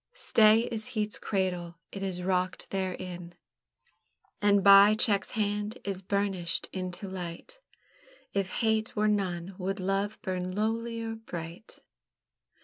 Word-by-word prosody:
Stay 220 Hz, -, +5 dB
is 225 Hz, 0 st, -4 dB
heat's 210 Hz, 0 st, -1 dB
cradle, 180 Hz, -4 st, -2 dB, 0.2 s
it 195 Hz, -, -6 dB
is 185 Hz, -2 st, -3 dB
rocked 185 Hz, 0 st, -1 dB
therein, 180 Hz, -2 st, -4 dB, 1.1 s
And 205 Hz, -1 st, +4 dB
by 200 Hz, +2 st, +8 dB
check's 210 Hz, -3 st, +2 dB
hand 210 Hz, +1 st, -1 dB
is 195 Hz, -2 st, -4 dB
burnished 195 Hz, -3 st, -1 dB
into 185 Hz, +1 st, -5 dB
light; 180 Hz, -, -7 dB, 0.7 s
If 195 Hz, -1 st, 0 dB
hate 220 Hz, -1 st, +1 dB
were 210 Hz, 0 st, +2 dB
none, 190 Hz, -3 st, -1 dB
would 195 Hz, +2 st, -2 dB
love 195 Hz, +3 st, -1 dB
burn 185 Hz, 0 st, -3 dB
lowlier 225 Hz, +1 st, -1 dB
bright? 170 Hz, +3 st, -8 dB
195 Hz, 120 wpm, -29 LUFS, 185-215 Hz, 1.1 s, by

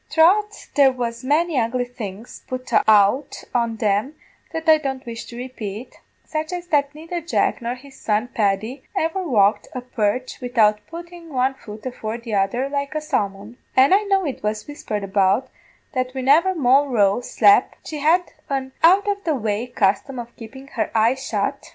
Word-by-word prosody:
Troth 410 Hz, +6 st, +2 dB
there 275 Hz, -2 st, +5 dB
was 235 Hz, -2 st, -4 dB
many 300 Hz, +2 st, +2 dB
ugly 245 Hz, +2 st, 0 dB
things 225 Hz, -3 st, -8 dB
put 255 Hz, 0 st, -6 dB, 0.2 s
out 215 Hz, +7 st, +3 dB
on 235 Hz, -2 st, 0 dB
them 215 Hz, +6 st, 0 dB, 0.4 s
that 325 Hz, 0 st, -5 dB
I 315 Hz, -1 st, +7 dB
don't 270 Hz, -3 st, -4 dB
wish 230 Hz, -1 st, -6 dB
to 235 Hz, -, -10 dB
repate, 240 Hz, -2 st, -7 dB, 0.3 s
such 310 Hz, +1 st, -3 dB
as 355 Hz, 0 st, -5 dB
that 285 Hz, -1 st, +1 dB
neither 330 Hz, +3 st, -5 dB
Jack 335 Hz, -5 st, 0 dB
nor 235 Hz, +1 st, -3 dB
his 270 Hz, +2 st, -15 dB
son 215 Hz, +3 st, 0 dB
Paddy 220 Hz, +5 st, -1 dB, 0.2 s
ever 325 Hz, +4 st, 0 dB
walked 205 Hz, -, +2 dB
a 255 Hz, -, -4 dB
perch 250 Hz, +1 st, -2 dB
widout 225 Hz, -4 st, +3 dB
puttin' 340 Hz, 0 st, -10 dB
one 260 Hz, 0 st, +1 dB
foot 215 Hz, -4 st, -11 dB
afore 230 Hz, -3 st, -4 dB
the 230 Hz, -2 st, -7 dB
other 205 Hz, +7 st, +1 dB
like 280 Hz, +1 st, -3 dB
a -, -, +1 dB
salmon; 205 Hz, -4 st, -3 dB, 0.2 s
an' 265 Hz, +6 st, +6 dB
I 400 Hz, -, +5 dB
know 390 Hz, -2 st, +2 dB
it 280 Hz, -, -4 dB
was 210 Hz, 0 st, -2 dB
whispered 215 Hz, -8 st, -5 dB
about, 195 Hz, +5 st, +2 dB, 0.4 s
that 255 Hz, 0 st, -2 dB
whinever 300 Hz, +9 st, +3 dB
Moll 275 Hz, -1 st, +4 dB
Roe 210 Hz, -3 st, +2 dB
slep', 215 Hz, 0 st, +4 dB
she 305 Hz, -, -5 dB
had 335 Hz, +5 st, +2 dB, 0.2 s
an 265 Hz, -1 st, -2 dB
out 380 Hz, +5 st, +5 dB
of 400 Hz, -1 st, -1 dB
the 315 Hz, -3 st, 0 dB
way 220 Hz, -1 st, -2 dB
custom 220 Hz, +3 st, 0 dB
of 240 Hz, 0 st, -7 dB
keepin' 265 Hz, +4 st, -11 dB
her -, -, -2 dB
eyes 235 Hz, +4 st, +2 dB
shut. -, -, -2 dB
255 Hz, 175 wpm, -22 LUFS, 220-295 Hz, 0.4 s, I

